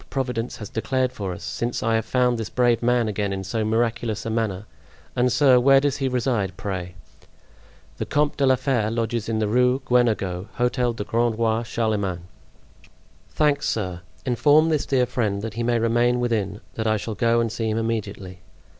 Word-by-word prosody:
Providence 125 -3 -3
has 105 - -7
declared 130 +3 0
for 100 -7 -5
us, 90 - -8
since 115 +7 -3
I 115 0 +1
have 110 -1 +1
found 125 -1 +2
this 110 - -4
brave 120 -2 +2
man 120 -1 +2
again 105 -1 -2
in 95 0 -3
so 110 +4 -2
miraculous 115 0 -1
a 115 - -2
manner. 110 -3 -2 0.5
And, 125 0 +2
sir, 130 -1 +5
where 135 +2 +6
does 140 0 0
he 135 - -1
reside, 115 -7 -1
pray?" 90 -3 -5 1.0
"The - - -4
Comte 145 0 +1
de 140 - +2
la 130 - +5
Fere 125 -4 0
lodges 115 0 -2
in 110 - 0
the 110 -1 0
Rue 125 +4 +3
Guenegaud, 105 -7 +1
Hotel 125 -1 0
du 110 - -4
Grand 115 +1 0
Roi 115 0 +1
Charlemagne." 105 -6 -2 1.1
"Thanks, 145 -2 +1
sir. 90 -5 -3 0.2
Inform 145 +5 +4
this 155 -3 0
dear 130 -2 +2
friend 105 -5 -2
that 110 -1 -4
he 115 - -4
may 120 0 +1
remain 120 +2 +2
within, 110 -4 -1
that 110 0 -2
I 110 0 +2
shall 110 +2 -5
go 115 +3 +2
and 115 -2 0
see 115 -1 -2
him 110 - -1
immediately." 100 -5 -4
115 Hz, 190 wpm, -23 LUFS, 105-125 Hz, 1.1 s, where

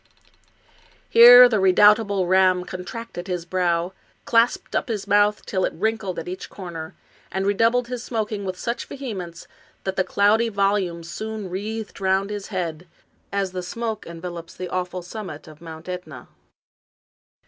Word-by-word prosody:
Here 245 +2 +10
the 220 -4 +1
redoubtable 200 +1 +4
Ramm 185 0 +3
contracted 180 +1 -7
his 180 -2 -3
brow, 175 0 0 0.3
clasped 230 +1 +2
up - - 0
his 215 -5 -3
mouth 205 +1 +2
till 185 -2 -1
it - - -1
wrinkled 215 0 -2
at 165 - -5
each 185 +1 -6
corner, 170 -2 -8 0.4
and 190 0 -2
redoubled 230 +4 +2
his 250 -1 -5
smoking 215 -4 -3
with 185 -1 -4
such 235 +4 -3
vehemence 190 -11 -7 0.4
that 190 0 -3
the 185 - +3
cloudy 215 +5 +2
volumes 195 -5 0
soon 215 -1 -6
wreathed 215 +2 -5
round 190 +1 +1
his 205 -1 -5
head, 175 -3 -4 0.4
as 200 -2 -1
the 185 0 -4
smoke 220 +3 -5
envelops 170 0 -8
the 180 -1 -6
awful 180 0 -3
summit 180 -5 -8
of 155 0 -14
Mount 160 -1 -10
^tna. 180 -8 -7
190 Hz, 150 wpm, -23 LUFS, 180-215 Hz, 0.4 s, Here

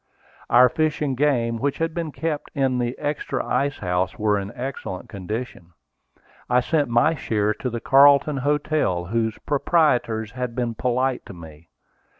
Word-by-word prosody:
Our 125 +2 +7
fish 155 +5 -1
and 135 -3 -1
game 120 -5 +1
which 140 +2 -1
had 165 0 -1
been 165 -2 -3
kept 155 0 -3
in 135 -3 +1
the 120 0 -2
extra 145 -3 -3
ice 140 +3 0
house 90 0 -1
were 105 -1 +1
in 100 +1 -6
excellent 125 -7 -6
condition. 100 -2 -6 0.8
I 125 0 +4
sent 145 0 0
my 120 +7 +3
share 110 -7 0
to 125 - -4
the 115 -1 -5
Carlton 140 +2 +5
Hotel, 145 - 0
whose 110 +2 -1
proprietors 125 -8 +1
had 125 -1 -4
been 120 -2 -1
polite 125 +2 -1
to 95 - -10
me. 80 -1 -13
125 Hz, 155 wpm, -23 LUFS, 110-145 Hz, 0.8 s, Our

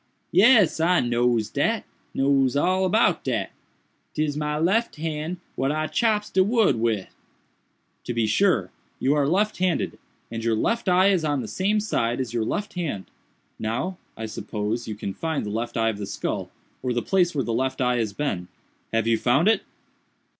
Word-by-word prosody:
"Yes, 210 -5 +5
I 175 +2 +4
knows 120 -2 +1
dat—knows 135 -1 0
all 185 +6 +2
about 215 +5 +2
dat—'tis 150 -1 -5
my 150 0 -1
lef 195 +9 +1
hand 155 +2 -3 0.2
what 135 +1 0
I 155 +1 -1
chops 210 +3 0
de 190 - +4
wood 210 - +3
wid." 110 -4 0 1.0
"To 120 - -2
be 115 -1 +2
sure! 185 - +2 0.3
you 135 - +2
are 145 -2 +2
left 205 +7 +1
handed; 180 -4 0 0.3
and 115 -1 -4
your 115 -1 +2
left 230 - 0
eye 185 +2 +5
is 185 -5 +2
on 145 -3 0
the 115 - -6
same 200 - 0
side 120 - -1
as 130 -3 -3
your 115 -2 0
left 205 - -3
hand. 150 - -4 0.5
Now, 125 +12 -2 0.2
I 110 - -4
suppose, 110 +1 -4
you 110 - -4
can 100 -2 -5
find 160 - -2
the 105 - -4
left 115 +2 -3
eye 115 0 +2
of 105 -2 -4
the 100 - -4
skull, 100 - -3 0.3
or 125 -1 -1
the 120 - -1
place 180 -3 +2
where 135 -4 0
the 115 - -2
left 130 +3 -1
eye 125 -1 +2
has 110 -3 -1
been. 100 -8 -3 0.4
Have 115 -1 +1
you 115 -1 +2
found 135 - +3
it?" 225 - +4
140 Hz, 180 wpm, -24 LUFS, 115-180 Hz, 1.0 s, Yes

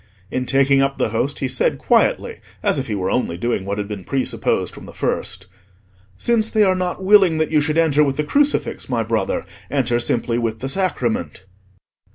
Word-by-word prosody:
In 130 0 -2
taking 135 0 +3
up 135 0 0
the - - 0
Host 125 +6 -1
he 135 - 0
said 130 0 +1
quietly, - - +1 0.2
as - - +1
if 135 - -4
he 110 - -2
were 95 -1 -2
only 85 -9 -1
doing 110 -1 -2
what 100 +1 -3
had 105 -1 -3
been 100 -3 -6
presupposed 135 +4 -1
from - - -11
the - - -12
first— - - -2 0.7
"Since 225 - +1
they 215 -1 +3
are 190 -2 +4
not 185 0 -3
willing 190 -4 +5
that 155 0 0
you 155 -1 +3
should 155 +2 0
enter 155 -3 +4
with 135 -2 -1
the 150 - +1
crucifix, 285 - 0
my - - 0
brother, - - -1 0.2
enter 125 -4 +1
simply 120 0 0
with 115 -2 -2
the 135 +4 -4
Sacrament." 120 - -2
135 Hz, 200 wpm, -20 LUFS, 115-160 Hz, 0.7 s, willing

